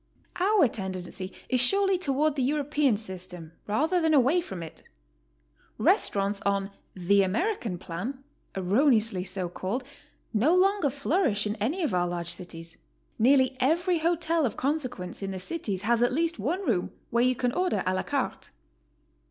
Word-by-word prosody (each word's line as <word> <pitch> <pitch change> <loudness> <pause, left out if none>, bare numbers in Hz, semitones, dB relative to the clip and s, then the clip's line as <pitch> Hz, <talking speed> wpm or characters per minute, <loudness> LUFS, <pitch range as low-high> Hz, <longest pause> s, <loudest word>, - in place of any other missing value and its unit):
Our 380 -4 +4
tendency 190 -2 -5 0.2
is 255 - +2
surely 390 +6 +3
toward 295 -2 +1
the 275 - -1
European 285 -2 +1
system 180 -5 -7 0.2
rather 315 - +1
than 320 -1 +3
away 280 +7 +4
from 190 - -7
it. 160 - -9 1.0
Restaurants 200 0 +1
on 200 0 -1 0.2
"the 195 +2 +3
American 220 - -1
plan," 205 +11 -6 0.3
erroneously 215 0 +2
so 185 -1 -2
called, 190 +8 -4 0.5
no 260 +11 +3
longer 385 -4 +3
flourish 280 - 0
in 210 0 -2
any 280 - -1
of 290 - 0
our 175 -1 +1
large 175 -1 -3
cities; 165 -1 -7 0.4
nearly 260 +2 +4
every 340 +6 +2
hotel 330 0 +1
of 245 - -1
consequence 255 - -3
in 195 - -3
the 190 -1 -4
cities 200 - -3
has 235 +2 +2
at 245 - +3
least 325 +1 0
one 340 - -2
room 190 - 0 0.2
where 235 +1 +3
you 255 0 +3
can 245 0 0
order 365 +6 0
a 185 - +1
la 185 - 0
carte. - - -3
245 Hz, 155 wpm, -27 LUFS, 190-310 Hz, 1.0 s, Our